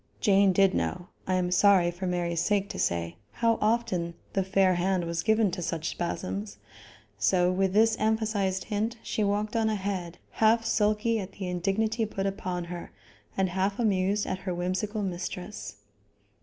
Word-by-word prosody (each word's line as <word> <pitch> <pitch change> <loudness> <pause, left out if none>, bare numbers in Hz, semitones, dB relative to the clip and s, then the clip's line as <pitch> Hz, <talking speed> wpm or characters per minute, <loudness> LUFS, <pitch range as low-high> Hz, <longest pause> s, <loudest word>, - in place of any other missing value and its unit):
Jane 200 -3 +4
did 195 +1 +4
know, 180 -1 -2 0.2
I 185 - +1
am 180 -1 0
sorry 180 -2 +5
for 180 +2 -5
Mary's 170 -2 -1
sake 200 -1 +1
to - - -6
say, 85 0 -1 0.2
how 230 -1 +1
often 200 -7 0 0.2
the 195 - +1
fair 190 0 +3
hand 180 0 0
was 170 0 -2
given 220 -1 +2
to 180 0 -4
such 165 -1 -2
spasms; 100 - -4 0.6
so 180 - +3
with 190 0 +1
this 220 +1 +4
emphasized 215 -3 0
hint 220 +2 -2
she 215 - -1
walked 205 +2 0
on 225 -1 +2
ahead, 190 -4 -3
half 225 +1 +3
sulky 215 +1 +1
at 195 -1 -6
the 190 -2 -5
indignity 210 +5 0
put 195 -2 -3
upon 185 -2 -3
her, 170 0 -7 0.5
and 190 -1 +2
half 190 +2 -1
amused 205 -2 +1
at 185 - -3
her 185 -2 -3
whimsical 190 +4 -2
mistress. 180 - -5
190 Hz, 165 wpm, -28 LUFS, 180-210 Hz, 0.6 s, sorry